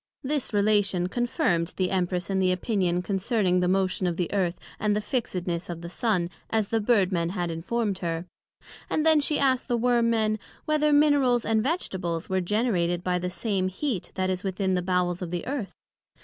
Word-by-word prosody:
This 285 0 -1
Relation 205 -3 +2
confirmed 230 - 0
the 185 -1 0
Empress 180 -1 -1
in 190 - +1
the 185 -1 +3
opinion 185 -2 0
concerning 195 -1 +1
the 180 - +1
motion 185 0 +1
of 170 -1 -2
the 175 +1 -2
Earth, 185 -3 0 0.2
and 210 0 +1
the - - +1
fixedness 180 -7 -3
of 170 -1 -5
the 170 - -7
Sun, 185 -6 0 0.2
as 220 -3 0
the 225 -1 +1
Bird 205 -4 +3
men 170 -2 0
had 175 -2 -2
informed 195 +4 -2
her; 165 -1 -3 0.6
and 310 - 0
then 315 -1 +6
she 295 +1 +2
asked 260 -2 +2
the 240 -2 +1
Worm 235 0 +2
men, 215 -1 +1 0.3
whether 300 0 +2
Minerals 285 -5 +4
and 220 0 +2
Vegetables 190 - -2
were 190 0 +2
generated 180 -4 0
by 180 -1 0
the 180 +1 -2
same 185 +1 -1
heat 195 - -3
that 185 0 0
is 185 0 -3
within 190 0 -1
the 180 - +1
Bowels 180 -1 0
of 180 - -4
the 175 0 -3
Earth? 260 -7 -4
190 Hz, 190 wpm, -26 LUFS, 180-230 Hz, 0.6 s, then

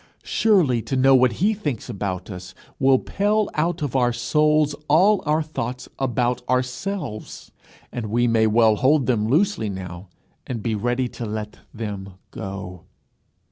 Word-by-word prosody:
Surely 175 - +3
to 135 - -3
know 135 +1 +5
what 130 -2 +5
he 200 - +2
thinks 150 - -4
about 100 -4 -4
us 90 0 -9 0.2
will 135 0 +5
pale 210 +7 0
out 165 +1 -1
of 135 -3 -3
our 125 -2 +3
souls 150 +3 +2
all 185 +7 +4
our 155 +1 +2
thoughts 125 -4 -5
about 125 -2 0
ourselves! 125 - -3 0.4
and 115 -3 -4
we 120 +3 +1
may 110 -1 +3
well 110 -1 +4
hold 135 +2 +3
them 110 -4 +1
loosely 160 - +1
now, 90 -1 -7 0.4
and 115 -5 -4
be 115 - 0
ready 120 +4 0
to 120 - -8
let 105 -1 -5
them 100 -4 -6 0.2
go. 95 -4 -7
125 Hz, 150 wpm, -23 LUFS, 110-150 Hz, 0.4 s, know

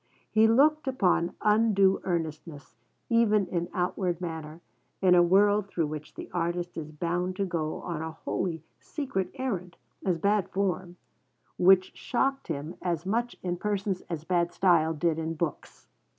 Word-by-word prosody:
He 220 +1 +5
looked 290 +6 +4
upon 185 -9 +1
undue 210 -3 +4
earnestness, 155 -6 -4 0.3
even 215 -3 +3
in 175 -1 -3
outward 180 -1 -1
manner, 160 -2 -6 0.4
in 185 -2 +5
a 175 - +7
world 200 +3 +4
through 170 -4 -1
which 150 0 -7
the - - -7
artist 175 0 -2
is 155 -2 -6
bound 175 +4 -2
to 195 - -1
go 160 -4 -2
on 170 -3 -4
a 160 - -3
wholly 160 0 -3 0.2
'secret 270 - -3
errand,' 200 -10 -4 0.3
as 180 -3 +1
bad 200 +2 +1
form, 185 -2 -2 0.6
which 185 +1 +5
shocked 270 +2 -1
him 155 +2 -5
as 170 -1 -2
much 235 +5 -1
in 175 -1 -2
persons 200 -1 -2
as 165 -3 -4
bad 175 0 +1
style 165 -4 +3
did 165 +1 0
in 160 0 -3
books. 160 -1 -5
180 Hz, 150 wpm, -28 LUFS, 165-200 Hz, 0.6 s, a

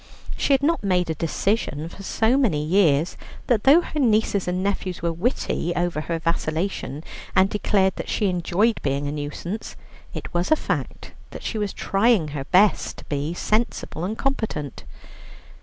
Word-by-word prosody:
She 280 - +2
had 270 0 +3
not 330 -2 +2
made 180 -3 +1
a - - 0
decision 165 -1 -1
for 185 - -11
so 220 +5 +1
many 190 - +2
years 165 -3 +3 0.3
that 225 -4 +1
though 295 +6 +7
her 305 - -5
nieces 215 -6 +2
and 180 +1 -1
nephews 190 -3 -2
were 170 -1 +1
witty 175 -2 -1
over 175 -3 0
her 165 +1 -2
vacillation, 160 -2 -2 0.3
and 190 +1 +4
declared 195 -2 +1
that - - -5
she 210 - 0
enjoyed 190 +4 +1
being 140 0 -1
a - - -2
nuisance, 150 +8 -5 0.4
it - - -7
was 175 +1 0
a - - +8
fact - - -4 0.2
that - - -9
she 220 - -3
was 205 -2 -1
trying 195 -5 +2
her 145 -2 -5
best 195 +6 +3
to - - -11
be 145 +3 -2
sensible 215 -6 -1
and 210 +5 -2
competent. 220 - -3
185 Hz, 170 wpm, -23 LUFS, 160-215 Hz, 0.4 s, a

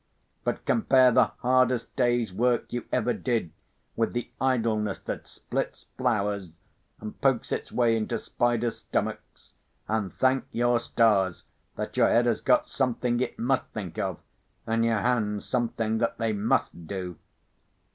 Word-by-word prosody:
But - - -2
compare 130 - +5
the - - +5
hardest 125 -1 +1
day's 120 -5 +1
work 120 +4 +1
you 120 - -3
ever 120 - +1
did 115 - -1 0.4
with 115 - 0
the 120 0 -3
idleness 115 -6 +1
that - - -5
splits - - -4
flowers 105 -7 0 0.5
and 105 0 -8
pokes 135 -4 +1
its - - -3
way 120 -2 +3
into 115 +1 -1
spiders' 120 0 0
stomachs, - - -4 0.3
and 105 -4 -1
thank 130 0 +2
your 120 0 +2
stars 105 -6 +2 0.3
that - - -5
your - - +5
head 120 +1 +4
has 120 -2 +1
got 305 0 +3
something 125 - 0
it 125 - -2
must 130 +2 +1
think 105 -1 -5
of, 95 -4 -2 0.5
and 115 +1 +1
your 115 -2 +2
hands 105 -4 0
something 115 -3 -1
that 115 0 0
they 115 -1 0
must 100 -5 0
do. 90 -3 -5
115 Hz, 145 wpm, -27 LUFS, 105-125 Hz, 0.5 s, compare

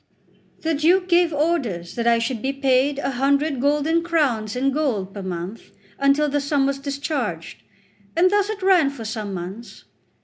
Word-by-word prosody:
The 325 0 0
Duke 350 +5 +3
gave 345 -1 +3
orders 285 - -1
that 235 -1 -2
I 235 0 +5
should 230 0 -2
be 270 - -1
paid 275 0 +1
a 280 - -2
hundred 275 +1 +1
golden 295 +4 +2
crowns 275 -11 0
in 270 +2 +1
gold 240 -10 -1
per 200 - -6
month, 185 +3 -6 0.3
until 275 +2 +3
the 290 0 0
sum 285 -1 +1
was 275 0 -1
discharged; 275 - -4 0.5
and 365 +2 +4
thus 410 0 +2
it 415 -3 -5
ran 365 -7 +4
for 265 -5 -8
some 215 -2 -4
months. 190 +5 -8
275 Hz, 170 wpm, -22 LUFS, 230-310 Hz, 0.5 s, I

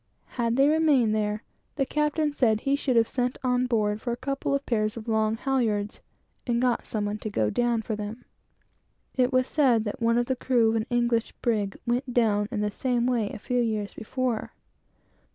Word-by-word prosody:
Had 235 -1 -1
they 275 +2 +5
remained 295 -8 +3
there, 210 0 -1 0.3
the 275 -1 +1
captain 300 +1 0
said 225 -6 +2
he 275 0 +1
should 275 -3 -1
have 230 -1 +4
sent 250 0 -1
on 250 0 +1
board 215 -3 0
for 240 - -2
a 235 - -2
couple 275 +1 -2
of 280 - -3
pairs 215 -2 0
of 225 0 -8
long 220 0 +1
halyards, 225 -6 -1 0.5
and 235 -1 +1
got 250 -1 0
some 210 -2 -2
one 205 +1 -3
to - - -5
have - - -14
gone 105 -1 +1
down 240 -2 +1
for 220 - -3
them. 210 +2 -7 0.9
It 255 0 +2
was 255 -1 +3
said 255 -7 +3
that 210 +2 -5
one 230 0 +3
of 240 - +2
the 260 - -1
crew 245 -3 +2
of - - -1
an 220 +2 -2
English 240 -2 +1
brig 210 -4 -1
went 245 +2 -1
down 210 -4 +2
in 220 -4 -2
the 210 0 0
same 245 +2 0
way, 235 -5 +1
a - - -7
few 245 +4 -1
years 215 -3 -2
before. 245 0 -3
235 Hz, 205 wpm, -26 LUFS, 215-255 Hz, 0.9 s, they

